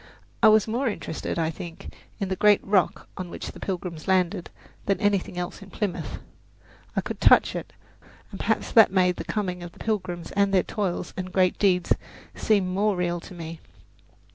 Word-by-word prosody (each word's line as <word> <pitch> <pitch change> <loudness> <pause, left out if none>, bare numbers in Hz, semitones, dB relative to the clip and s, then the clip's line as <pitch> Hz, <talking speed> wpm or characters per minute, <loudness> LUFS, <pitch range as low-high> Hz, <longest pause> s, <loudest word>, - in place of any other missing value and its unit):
I 225 - +8
was 215 -1 +5
more 245 +5 0
interested, 205 -8 -3
I 165 -1 +1
think, 165 +1 -9 0.3
in 195 -2 -2
the 190 - 0
great 210 +1 +4
rock 195 -2 +1
on 185 -2 -5
which - - -6
the - - -12
Pilgrims 180 -3 -5
landed 185 -1 +1 0.4
than 195 - +2
in 210 - -2
anything 200 -3 +1
else 180 +3 -4
in 195 - -11
Plymouth. 200 -2 -3 0.8
I - - +2
could - - -6
touch - - +6
it, - - -5 0.6
and - - -8
perhaps - - 0
that 225 -5 +7
made 180 -2 +3
the - - -4
coming 185 -4 -2
of 175 -1 -8
the - - -19
Pilgrims 185 -6 -3
and 200 0 +2
their 190 -2 +4
toils 190 -4 -3
and 185 -1 -5
great 185 -1 +2
deeds 180 -3 +3 0.4
seem 200 -4 +2
more 200 +3 +1
real 175 -1 -1
to 180 - -11
me. 165 -1 -7
185 Hz, 190 wpm, -25 LUFS, 175-205 Hz, 0.8 s, I